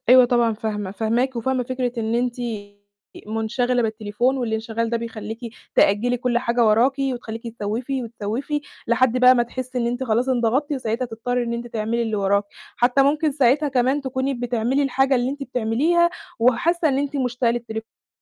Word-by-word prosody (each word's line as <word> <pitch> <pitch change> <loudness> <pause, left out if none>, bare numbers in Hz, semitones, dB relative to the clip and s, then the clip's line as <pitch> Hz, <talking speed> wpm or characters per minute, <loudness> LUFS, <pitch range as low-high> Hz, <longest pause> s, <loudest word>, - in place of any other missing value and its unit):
أيوه 255 0 +8
طبعًا 240 -2 +2
فاهمة، 210 -3 -4
فاهماكِ 230 +5 0
وفاهمة 255 +2 0
فكرة 255 0 -2
إن 225 +1 -1
أنتِ 245 0 0 0.9
منشغلة 235 +3 0
بالتليفون 220 +3 0
والإنشغال 225 -1 -2
ده 235 - 0
بيخليكِ 225 -1 -6 0.4
تأجّلي 235 +5 +3
كُلّ 245 0 0
حاجة 235 -1 +2
وراكِ، 230 +5 +4
وتخليكِ 240 -4 -3
تسوّفي 245 +6 -2
وتسوّفي، 235 +6 -3 0.3
لحد 240 +1 +3
بقى 255 0 +7
ما 240 - +3
تحسي 255 +1 -6
إن 235 -1 +1
أنتِ 245 +2 -2
خلاص 240 +2 +1
انضغطتِ، 255 +4 +1
وساعتها 250 -2 -2
تضطّري 245 +2 -2
إن 235 0 -3
أنتِ 235 +1 -4
تعملي 230 +1 -2
اللي 225 -2 -1
وراكِ، 200 0 +2 0.3
حتى 250 +3 +3
ممكن 295 +2 +2
ساعتها 280 +2 +3
كمان 265 +2 +1
تكوني 265 0 -2
بتعملي 245 +2 0
الحاجة 270 0 +2
اللي 245 0 +1
أنتِ 280 +1 -4
بتعمليها، 275 +8 +2 0.3
وحاسة 315 +9 +3
إن 265 - +1
أنتِ 285 +1 -2
مشتاقة 250 -2 +1
للتليفون 225 -2 -7
245 Hz, 165 wpm, -22 LUFS, 225-260 Hz, 0.9 s, أيوه